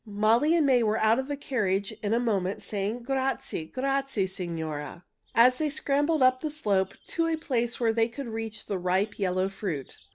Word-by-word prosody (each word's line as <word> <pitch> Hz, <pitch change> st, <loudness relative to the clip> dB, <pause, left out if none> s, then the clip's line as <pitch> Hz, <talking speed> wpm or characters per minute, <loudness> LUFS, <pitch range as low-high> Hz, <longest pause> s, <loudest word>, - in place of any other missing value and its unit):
Molly 225 Hz, +9 st, +3 dB
and 325 Hz, -3 st, +3 dB
May 255 Hz, -3 st, +4 dB
were 215 Hz, -1 st, +1 dB
out 220 Hz, +3 st, +3 dB
of 265 Hz, -, -3 dB
the 290 Hz, -1 st, -3 dB
carriage 205 Hz, -8 st, -1 dB
in 205 Hz, -, -2 dB
a 230 Hz, -, +3 dB
moment 200 Hz, -5 st, -1 dB
saying, 210 Hz, +4 st, -3 dB
"Grazie, 270 Hz, -8 st, -2 dB
grazie, 270 Hz, -3 st, -1 dB
signora!" 170 Hz, -3 st, -5 dB, 0.3 s
as 250 Hz, +2 st, +6 dB
they 310 Hz, -1 st, +1 dB
scrambled 290 Hz, +1 st, +1 dB
up 255 Hz, 0 st, +4 dB
the 310 Hz, -, -2 dB
slope 200 Hz, -10 st, +1 dB
to 330 Hz, 0 st, 0 dB
a 325 Hz, -1 st, 0 dB
place 240 Hz, -6 st, -1 dB
where 230 Hz, -2 st, +2 dB
they 225 Hz, 0 st, +2 dB
could 245 Hz, +3 st, -7 dB
reach 225 Hz, -1 st, -5 dB
the 195 Hz, -2 st, -3 dB
ripe, 190 Hz, +4 st, 0 dB
yellow 185 Hz, -1 st, +1 dB
fruit. 185 Hz, -8 st, -5 dB
225 Hz, 190 wpm, -27 LUFS, 195-270 Hz, 0.3 s, as